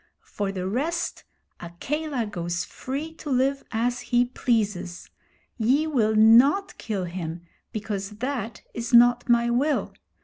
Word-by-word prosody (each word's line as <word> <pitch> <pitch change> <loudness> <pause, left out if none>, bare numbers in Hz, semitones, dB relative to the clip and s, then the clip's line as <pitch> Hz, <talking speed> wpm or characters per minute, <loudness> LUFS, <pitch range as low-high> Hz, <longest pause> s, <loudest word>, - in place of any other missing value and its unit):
For 200 -1 -3
the 185 -1 -4
rest, 305 - -2 0.3
Akela 260 - -3
goes 175 -4 -3
free 290 +5 -5
to 315 -2 -9
live 270 +1 +1
as 240 +2 -1
he 245 0 +2
pleases. 210 -8 -2 0.5
Ye 260 +8 +3
will 230 -8 +1
not 245 - +5
kill 205 -4 -3
him, 175 -1 -5 0.3
because 205 -3 -4
that 240 -2 -4
is 235 +1 0
not 245 +1 +5
my 235 0 +3
will. 280 +5 0
235 Hz, 130 wpm, -25 LUFS, 205-270 Hz, 0.5 s, not